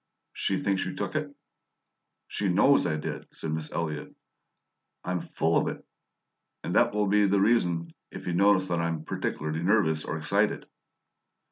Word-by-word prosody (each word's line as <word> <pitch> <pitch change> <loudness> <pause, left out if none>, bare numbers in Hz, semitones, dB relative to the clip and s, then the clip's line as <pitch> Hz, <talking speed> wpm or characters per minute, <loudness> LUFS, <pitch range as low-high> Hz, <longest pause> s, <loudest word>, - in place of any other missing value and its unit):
"She 95 - 0
thinks 95 0 0
you 95 - -5
took - - -3
it?" 150 -1 -1 1.0
"She 100 - -1
KNOWS 120 +9 +4
I 80 - 0
did," 75 - -5
said 80 - -5
Miss 80 0 -3
Elliott. 80 -3 -4 0.9
"I'm 90 0 -1
full 80 +1 +1
of - - -1
it! - - -5 0.8
And - - -3
that - - +4
will 105 0 +2
be 105 +1 +4
the 100 +1 +3
reason 90 -6 +2 0.2
if - - -9
you 90 - -1
notice 95 +1 +4
that 85 -1 0
I'm 85 -2 -2
particularly 80 +1 -3
nervous 85 -5 +2
or 80 - -3
excited." 80 - 0
90 Hz, 160 wpm, -28 LUFS, 80-100 Hz, 1.0 s, KNOWS